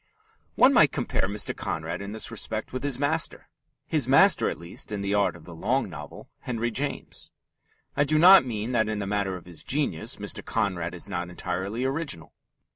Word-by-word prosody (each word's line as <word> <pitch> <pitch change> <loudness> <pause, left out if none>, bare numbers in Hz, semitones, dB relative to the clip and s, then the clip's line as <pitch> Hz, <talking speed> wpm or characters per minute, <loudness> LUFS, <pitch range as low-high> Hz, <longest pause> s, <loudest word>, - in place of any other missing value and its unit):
One 260 +2 +6
might 155 - +6
compare 120 -7 -1
Mr. 105 +1 -2
Conrad 85 +3 -4
in 100 0 -6
this 110 +1 -3
respect 110 0 -4
with 130 - -3
his 140 -3 +1
master 145 +3 0 0.4
his 150 -6 +1
master, 165 +9 +5
at - - -5
least, 85 +4 -4
in 105 -1 -3
the 100 0 -1
art 100 -3 +2
of 85 -2 -14
the 85 - -10
long 110 +5 -1
novel - - -9
Henry 120 -1 -2
James. 140 +6 -4 0.6
I 145 - +3
do 155 +2 +2
not 185 +4 +9
mean 115 -2 -3
that 110 -3 +1
in 110 - -2
the 100 - -3
matter 100 -1 -1
of 90 - -10
his 85 -3 -10
genius 135 - -1
Mr. - - -5
Conrad 90 -6 -1
is 90 - -6
not 90 -2 -3
entirely 95 +7 -3
original. 135 - -3
110 Hz, 195 wpm, -26 LUFS, 90-135 Hz, 0.6 s, not